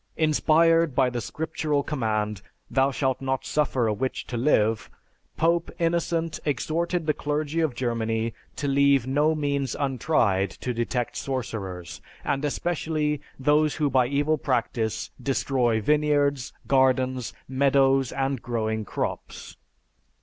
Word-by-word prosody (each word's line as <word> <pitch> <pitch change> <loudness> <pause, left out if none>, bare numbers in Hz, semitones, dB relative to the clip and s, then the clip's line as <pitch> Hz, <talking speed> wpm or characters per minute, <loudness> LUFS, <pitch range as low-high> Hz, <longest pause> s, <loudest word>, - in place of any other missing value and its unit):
Inspired 160 0 +3
by 130 -2 +3
the 120 -1 -3
scriptural 150 +3 -2
command, 110 -8 -2 0.3
'Thou 135 +1 +3
shalt 135 -1 -1
not 135 0 -2
suffer 135 -5 +1
a 110 - +1
witch 130 +5 -3
to 125 - -6
live,' 115 -4 +2 0.5
Pope 170 +1 +2
Innocent 165 -1 0
exhorted 160 +4 -1
the 155 - +2
clergy 150 +2 -2
of 155 -6 0
Germany 115 -2 -1 0.2
to 145 - -3
leave 140 -2 +4
no 150 +4 +2
means 140 -3 -1
untried 125 -8 +1
to 125 - -5
detect 120 +1 -2
sorcerers, 100 -9 -5 0.2
and 135 +1 -1
especially, 150 -1 -1 0.2
those 150 +2 +2
who 150 -3 0
by 125 -1 +3
evil 145 +3 +1
practice 115 -5 -1
destroy 125 -3 +1
vineyards, 145 +1 +1
gardens, 130 -2 +2 0.2
meadows, 135 -1 +3
and 135 -2 -1
growing 110 -2 -2
crops. - - -5
135 Hz, 125 wpm, -25 LUFS, 120-150 Hz, 0.5 s, leave